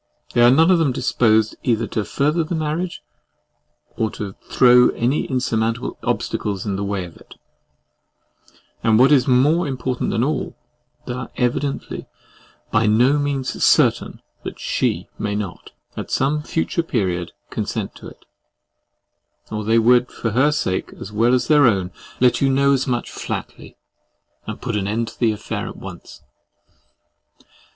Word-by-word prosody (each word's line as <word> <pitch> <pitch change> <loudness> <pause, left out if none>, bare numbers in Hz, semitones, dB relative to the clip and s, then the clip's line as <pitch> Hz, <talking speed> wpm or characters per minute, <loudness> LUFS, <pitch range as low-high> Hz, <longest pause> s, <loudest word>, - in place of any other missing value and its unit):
They 120 - +3
are 120 - +7
none 160 +7 +5
of 180 - +4
them 155 -5 +2
disposed 110 -3 +2
either 115 -2 +1
to 110 - -1
further 150 +9 0
the 170 +2 -3
marriage, 160 +3 -3 0.9
or 110 - 0
throw 125 +5 +3
any 125 +5 0
insurmountable 115 -2 -1
obstacles 100 -3 -2
in 100 -2 -2
the 100 - -3
way 100 -2 -2
of 85 - -13
it; - - -16 1.5
and 110 -1 +4
what 130 +4 +5
is 140 -2 +4
more 145 +7 +3
important 130 -2 -2
than 115 - 0
all, 145 0 -2 0.5
they - - -4
are 125 -1 -6
evidently 135 +3 -2 0.6
by 110 - +2
no 125 +7 +4
means 140 -2 -2
CERTAIN - - +2 0.2
that - - -7
SHE - - -1
may 105 -1 -2
not, 105 -4 -5 0.3
at - - -6
some 145 +3 +1
future 165 +3 -1
period, 95 - -2 0.2
consent - - -3
to - - -11
it; - - -15 1.3
or 105 0 -3
they 110 +2 +2
would, 125 +2 +4
for 115 - -3
her 135 +7 +3
sake 95 -11 -2
as 100 - -8
well 115 +4 +3
as 125 -1 -1
their 150 -3 +6
own, 95 -5 +1 0.3
let 125 -1 +3
you 135 - +3
know 140 +1 +3
as 135 0 0
much 120 -2 -2
flatly, - - -7 0.7
and - - -7
put 120 -3 -2
an 100 -2 -1
end 115 +2 -1
to - - -17
the 115 -2 +3
affair 105 -1 -4
at - - -8
once. - - -11
125 Hz, 155 wpm, -21 LUFS, 110-140 Hz, 1.5 s, are